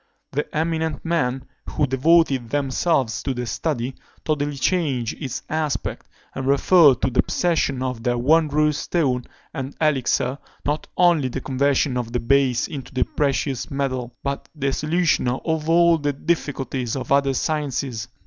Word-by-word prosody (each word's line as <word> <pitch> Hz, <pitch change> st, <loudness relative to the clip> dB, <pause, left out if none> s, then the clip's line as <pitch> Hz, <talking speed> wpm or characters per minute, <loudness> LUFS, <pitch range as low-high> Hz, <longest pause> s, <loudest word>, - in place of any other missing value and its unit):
The 150 Hz, -, -2 dB
eminent 160 Hz, -2 st, -1 dB
men 135 Hz, -6 st, 0 dB, 0.2 s
who -, -, +1 dB
devoted 135 Hz, -2 st, +3 dB
themselves 135 Hz, -2 st, 0 dB
to 135 Hz, -, -2 dB
the 125 Hz, 0 st, -3 dB
study 130 Hz, -1 st, -2 dB, 0.3 s
totally 145 Hz, -2 st, -1 dB
changed 135 Hz, -6 st, 0 dB
its 130 Hz, -4 st, -4 dB
aspect, 155 Hz, -2 st, -2 dB, 0.3 s
and 135 Hz, 0 st, -4 dB
referred 140 Hz, 0 st, +5 dB
to 130 Hz, -, +2 dB
the 125 Hz, -, +4 dB
possession 150 Hz, -7 st, 0 dB
of 125 Hz, -3 st, -3 dB
their 120 Hz, 0 st, 0 dB
wondrous 150 Hz, +2 st, +3 dB
stone 130 Hz, -8 st, 0 dB, 0.3 s
and 135 Hz, -2 st, -5 dB
elixir, 135 Hz, -3 st, +1 dB, 0.3 s
not 150 Hz, +1 st, -1 dB
only 170 Hz, -6 st, +4 dB
the 130 Hz, +2 st, -4 dB
conversion 135 Hz, 0 st, +1 dB
of 120 Hz, -1 st, -4 dB
the 120 Hz, -, +1 dB
base 130 Hz, 0 st, +2 dB
into 140 Hz, -4 st, -7 dB
the 130 Hz, -2 st, +1 dB
precious 140 Hz, -3 st, -1 dB
metals, 130 Hz, -3 st, -2 dB
but 140 Hz, 0 st, -4 dB
the 140 Hz, -2 st, -1 dB
solution 160 Hz, -1 st, +1 dB
of 155 Hz, +5 st, -1 dB
all 170 Hz, 0 st, +5 dB
the 145 Hz, -1 st, -1 dB
difficulties 135 Hz, -5 st, -2 dB
of 135 Hz, -, -5 dB
other 140 Hz, -1 st, +3 dB
sciences. 140 Hz, -6 st, -2 dB
140 Hz, 150 wpm, -22 LUFS, 130-155 Hz, 0.3 s, referred